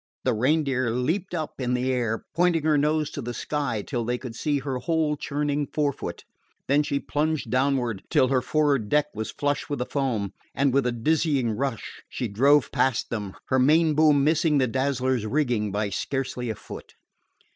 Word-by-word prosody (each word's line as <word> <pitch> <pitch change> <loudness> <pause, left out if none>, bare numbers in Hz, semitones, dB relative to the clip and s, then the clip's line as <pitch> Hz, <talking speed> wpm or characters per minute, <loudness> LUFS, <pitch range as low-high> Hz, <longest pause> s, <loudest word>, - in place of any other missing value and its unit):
The 130 - +2
Reindeer 130 +1 +1
leaped 160 - -1
up 155 -4 -4
in 125 0 0
the 125 +1 0
air, 115 -3 -1
pointing 170 -1 +2
her 155 -1 +3
nose 150 +1 +1
to 140 - -5
the 120 0 -5
sky 140 -8 -2
till 120 0 -3
they 120 +2 -1
could 125 -2 -8
see 145 +3 0
her 135 -2 -3
whole 160 0 0
churning 145 0 -2
forefoot; 145 -2 -3 0.4
then 140 +2 +4
she 145 -1 -1
plunged 155 +2 -1
downward 130 -5 +1
till 130 - +3
her 130 -2 +2
for'ard 140 -5 +1
deck 150 0 +2
was 110 0 -4
flush 145 +3 -2
with 145 - -1
the 125 - -2
foam, 115 -9 -2 0.2
and 140 -2 +2
with 135 -2 +2
a - - +1
dizzying 135 0 +1
rush 120 0 -4
she 125 - -3
drove 130 +5 +3
past 130 -2 0
them, 105 -4 -4
her 130 - +3
main 155 +4 +4
boom 150 -2 +4
missing 155 0 +3
the 130 - +3
Dazzler's 130 -2 0
rigging 120 -5 0
by 105 +1 -1
scarcely 125 +1 -3
a 110 - -2
foot. - - -11
135 Hz, 185 wpm, -25 LUFS, 120-150 Hz, 0.4 s, then